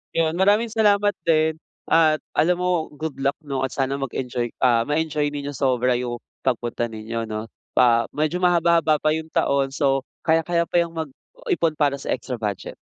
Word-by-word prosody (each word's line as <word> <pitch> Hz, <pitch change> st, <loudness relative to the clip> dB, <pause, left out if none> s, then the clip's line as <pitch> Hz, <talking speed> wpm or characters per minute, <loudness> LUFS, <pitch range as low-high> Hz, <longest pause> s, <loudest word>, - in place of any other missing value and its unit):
Yun. 160 Hz, -1 st, +2 dB
Maraming 210 Hz, +4 st, +3 dB
salamat 205 Hz, -2 st, +3 dB
din 160 Hz, -1 st, +2 dB, 0.4 s
at 160 Hz, -2 st, +4 dB, 0.2 s
alam 175 Hz, +2 st, +2 dB
mo, 180 Hz, -3 st, 0 dB
good 160 Hz, -1 st, -4 dB
luck 140 Hz, +1 st, 0 dB
'no 135 Hz, -2 st, -2 dB
at 135 Hz, -, 0 dB
sana 135 Hz, 0 st, -1 dB
mag-enjoy 125 Hz, -2 st, -3 dB
ah, 120 Hz, -3 st, +4 dB
ma-enjoy 150 Hz, -1 st, 0 dB
ninyo 145 Hz, 0 st, -5 dB
sobra 125 Hz, -2 st, +1 dB
yung 120 Hz, -1 st, -3 dB, 0.2 s
pagpunta 120 Hz, -2 st, -1 dB
ninyo 115 Hz, +1 st, -5 dB
'no. 110 Hz, +1 st, -4 dB, 0.3 s
Ah, 115 Hz, -2 st, +4 dB
medyo 155 Hz, +4 st, -1 dB
mahaba-haba 170 Hz, -3 st, +3 dB
pa 155 Hz, +1 st, +1 dB
yung 160 Hz, 0 st, -4 dB
taon 140 Hz, -3 st, +1 dB
so 135 Hz, 0 st, +1 dB, 0.2 s
kayang 165 Hz, 0 st, +3 dB
kaya 170 Hz, -1 st, +1 dB
pa 175 Hz, -, +2 dB
yang 170 Hz, -1 st, -3 dB
mag-ipon 160 Hz, +1 st, -3 dB
para 145 Hz, -2 st, +2 dB
sa -, -, -8 dB
extra 125 Hz, -3 st, -2 dB
budget. 105 Hz, -3 st, -3 dB
150 Hz, 170 wpm, -23 LUFS, 130-165 Hz, 0.4 s, at